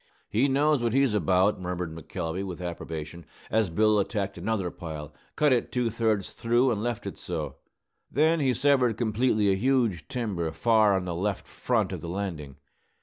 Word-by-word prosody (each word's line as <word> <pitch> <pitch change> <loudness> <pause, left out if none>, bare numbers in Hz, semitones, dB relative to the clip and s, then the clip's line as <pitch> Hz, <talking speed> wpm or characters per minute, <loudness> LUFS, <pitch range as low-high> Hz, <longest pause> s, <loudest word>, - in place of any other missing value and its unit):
"He 120 +6 +3
knows 145 0 +2
what 115 -1 0
he's 135 -3 +3
about," 95 0 +2
murmured 90 -2 -3
McElvey, 80 +3 -4
with 95 -2 -6
approbation, 85 -2 -6 0.3
as 110 -3 +2
Bill 105 +4 +3
attacked 100 -1 -2
another 95 -1 -2
pile, 75 -3 -7 0.2
cut 150 -3 +4
it 120 - 0
two 125 -2 0
thirds 110 -3 0
through, 120 +2 +2
and 105 -3 -1
left 120 -1 -3
it - - -6
so. - - -4 0.5
Then 160 +5 +3
he 130 -4 +2
severed 130 -3 +3
completely 110 -2 +2
a - - +3
huge 115 - +1
timber 100 -10 -2
far 105 +4 +4
on 95 -1 -1
the 90 - -3
left 95 +3 -2
front - - 0
of - - -5
the 85 - -6
landing. 85 -7 -4
105 Hz, 175 wpm, -27 LUFS, 90-120 Hz, 0.5 s, cut